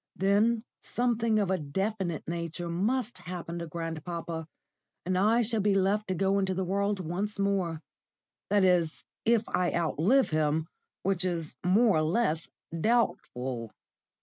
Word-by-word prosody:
"Then 210 +4 +2 0.2
something 230 -2 +1
of 200 -3 +1
a 190 - +1
definite 190 +3 -2
nature 170 +1 -4
must 215 +5 0
happen 175 -1 -6
to 170 - -5
grandpapa, 165 0 -5 0.6
and 185 +1 0
I 220 +6 +4
shall 225 -1 0
be 200 0 +3
left 200 +2 +2
to 185 - -1
go 195 +2 +2
into 190 -1 0
the 190 - 0
world 200 +2 0
once 185 +5 -3
more 190 -5 0 0.7
that 205 -1 +4
is, 175 -4 +2 0.2
if 230 -1 +3
I 180 -1 +1
outlive 170 - +2
him, 155 0 +1 0.4
which 190 -1 +1
is 170 -6 -2
more 200 +2 +4
or - - +3
less 165 -1 +1 0.3
doubtful." 130 - 0
185 Hz, 145 wpm, -29 LUFS, 165-210 Hz, 0.7 s, I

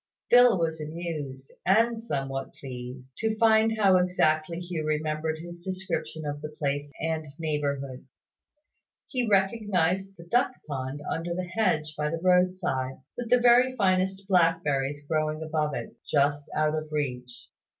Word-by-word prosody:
Phil 245 -3 +7
was 160 -2 -1
amused, 150 -4 -5
and 225 +4 +3
somewhat 135 -9 -3
pleased, 125 0 -9
to 220 -1 -1
find 220 0 +4
how 195 -3 +5
exactly 170 -2 +1
Hugh 175 -3 -4
remembered 155 +1 -1
his 170 +1 -9
description 185 -4 -4
of 145 0 -4
the 150 - -5
place 145 -1 -3
and 160 -1 -2
neighbourhood. 140 -5 -3 1.0
He 250 -4 -2
recognised 195 -2 +1
the 170 - -12
duck 245 +7 +2
pond 135 0 -4
under 170 +1 -2
the 185 - -2
hedge 160 -6 0
by 150 0 -1
the 165 - -2
road 180 +1 +3
side, 130 -7 -2 0.2
with 245 -2 -5
the 250 - +6
very 245 +1 +5
finest 190 -2 +1
blackberries 150 -6 +2
growing 155 0 -1
above 155 -2 -1
it, - - -6
just 145 0 +1
out 155 0 +2
of 155 0 -4
reach. 125 -5 -4
160 Hz, 145 wpm, -27 LUFS, 145-190 Hz, 1.0 s, Phil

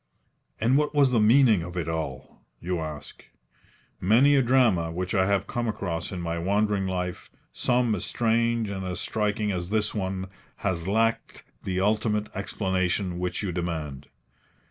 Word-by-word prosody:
And 120 +5 +3
what 150 0 -1
was 140 -3 +4
the 120 - +3
meaning 110 -2 +5
of 90 +2 -7
it 85 -3 -2
all? 80 -5 -5 0.2
you 90 0 -2
ask. 75 -2 -7 0.8
Many 120 +9 +5
a 135 - +5
drama 115 -10 +3
which 90 +2 -3
I 95 -1 +3
have 100 -1 +1
come 120 -1 -2
across 85 -6 -3
in 90 - -4
my 85 0 -2
wandering 100 +2 +1
life, 90 -1 -4 0.2
some 120 -2 +1
as 100 - -2
strange 115 -1 +1
and 95 -1 -4
as 90 -1 -3
striking 105 0 -1
as 90 -2 -3
this 105 0 0
one, 95 -2 -3 0.4
has 90 -3 -1
lacked 115 +3 0 0.2
the 95 0 -1
ultimate 105 +1 0
explanation 95 -2 -1
which 90 +3 -2
you 95 - -1
demand. 80 -6 -4
95 Hz, 160 wpm, -26 LUFS, 90-110 Hz, 0.8 s, meaning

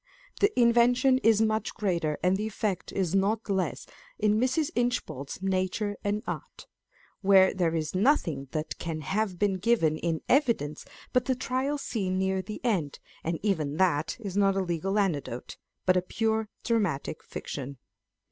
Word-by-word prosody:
The 405 - +4
invention 245 +2 +4
is 225 -2 +4
much 215 0 -1
greater 170 -7 0
and 180 +1 +3
the 210 +2 -2
effect 210 -3 -3
is 185 -3 -1
not 205 +4 +1
less 190 -2 -1 0.3
in 210 0 +2
Mrs. 260 +5 +1
Inchbald's 190 - -2
Nature 195 +2 0
and 205 +2 -1
Art, - - -6 0.6
where 190 -1 +6
there 170 -3 0
is 155 -2 -2
nothing 185 - +1
that 155 -1 -4
can 160 -2 -4
have 195 +4 -1
been 195 0 +1
given 180 -7 +2
in 165 -2 -1
evidence 230 - +1 0.3
but 250 -1 +2
the 260 - +1
Trial 260 +3 -1
Scene 195 -9 -2
near 190 0 +1
the 210 +3 -7
end, 175 - 0 0.3
and 165 0 -1
even 155 -8 0
that 165 -5 +1
is 200 -4 -6
not 195 -1 +3
a 195 - +1
legal 180 +3 -1
anecdote, 145 - -2 0.3
but 185 - +4
a 180 - +3
pure 220 +3 -1
dramatic 195 - -1
fiction. 140 -1 -6
195 Hz, 155 wpm, -28 LUFS, 165-220 Hz, 0.6 s, where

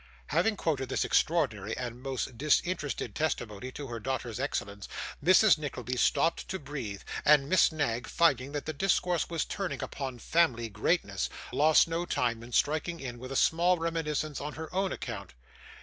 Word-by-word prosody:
Having 220 -2 +2
quoted 135 -8 -1
this - - 0
extraordinary 115 - +1
and 125 -1 -5
most 130 -2 -3
disinterested 150 - 0
testimony 125 -6 -2
to 145 - -6
her 120 -3 -5
daughter's 120 -2 -3
excellence, 100 0 -3 0.4
Mrs. 185 0 +6
Nickleby 130 -4 -4
stopped 165 +6 +2
to 190 - -3
breathe; 135 - -6 0.2
and 145 -2 +5
Miss 185 +2 +5
Knag, 135 -7 -1
finding 140 -5 +2
that 145 - -3
the 155 - -3
discourse 180 0 +1
was 165 -2 -1
turning 195 -2 -3
upon 135 -3 -5
family 120 -5 +1
greatness, 105 - 0 0.2
lost 155 +3 +5
no 165 +1 -2
time 115 -2 0
in 120 +1 -11
striking 155 +6 +1
in, 125 -3 -6
with 130 +2 -8
a - - -3
small 175 +5 +3
reminiscence 155 -3 -2
on 150 +1 -4
her 160 +2 -7
own 190 +1 0
account. 100 - -6
145 Hz, 165 wpm, -30 LUFS, 120-165 Hz, 0.4 s, Mrs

